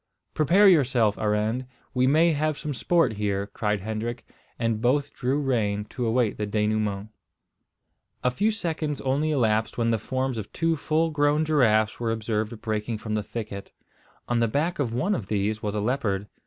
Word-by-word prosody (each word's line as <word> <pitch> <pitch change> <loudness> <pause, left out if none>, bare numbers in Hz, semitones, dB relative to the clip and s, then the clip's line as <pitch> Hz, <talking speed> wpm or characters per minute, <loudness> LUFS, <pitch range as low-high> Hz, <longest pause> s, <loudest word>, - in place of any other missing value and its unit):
"Prepare 180 +7 +5
yourself, 125 - +4
Arend; 110 +4 0 0.3
we 130 -1 +2
may 160 +5 +4
have 155 0 0
some 150 -1 -4
sport 130 -3 +1
here," 100 -1 -1
cried 105 0 -2
Hendrik, 110 +3 -4 0.3
and 115 -2 -1
both 140 +4 +1
drew 135 +3 0
rein 105 -7 0
to 125 -2 -2
await 115 -1 +1
the 105 - -2
denouement. 105 -1 -1 1.1
A 125 - +2
few 205 - +1
seconds 160 -8 -2
only 140 +4 0
elapsed 110 -6 +1
when 115 -1 +1
the 115 - +1
forms 130 +1 -2
of 105 - -7
two 165 0 +1
full 160 +2 0
grown 150 +1 +2
giraffes 110 -8 +2
were 115 -1 -1
observed 110 0 -2
breaking 110 +1 -2
from 110 0 -5
the 105 - 0
thicket. 105 -2 -7 0.5
On 120 -1 +1
the 115 - +3
back 150 +10 -1
of 130 -5 0
one 155 - 0
of 110 - -3
these 105 +1 -1
was 105 0 -3
a - - 0
leopard. 105 -4 -1
115 Hz, 175 wpm, -25 LUFS, 105-145 Hz, 1.1 s, Prepare